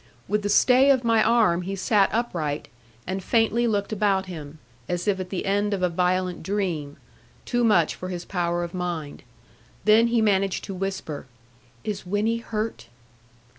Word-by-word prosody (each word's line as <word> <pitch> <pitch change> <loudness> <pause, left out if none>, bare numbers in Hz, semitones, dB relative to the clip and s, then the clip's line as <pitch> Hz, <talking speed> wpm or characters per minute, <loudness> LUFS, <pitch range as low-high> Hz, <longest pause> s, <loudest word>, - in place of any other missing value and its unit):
With 210 +2 0
the 205 - -2
stay 255 +6 +5
of 260 -3 +4
my 230 -1 +3
arm 215 -7 +3
he 195 +2 -4
sat 195 +1 +3
upright, 170 -11 -2 0.4
and 190 +1 -4
faintly 230 +2 +2
looked 205 -1 -1
about 195 -2 +1
him; 155 -4 -8 0.3
as 175 +1 -2
if 195 -2 +1
at 185 -1 -5
the 185 - -3
end 205 +1 +1
of 185 - -4
a 180 - +3
violent 180 +1 0
dream, 170 -7 -2 0.5
too 245 -1 0
much 180 -9 +3
for 185 - -7
his 175 -1 -5
power 175 -2 -1
of 170 - -6
mind. 175 -5 -4 0.6
Then 220 +2 +6
he 235 0 +2
managed 195 -3 +1
to 195 - -6
whisper, 185 -7 -4 0.6
'Is 205 -2 -4
Winnie 205 +5 0
hurt?' 220 - -4
195 Hz, 170 wpm, -25 LUFS, 180-215 Hz, 0.6 s, Then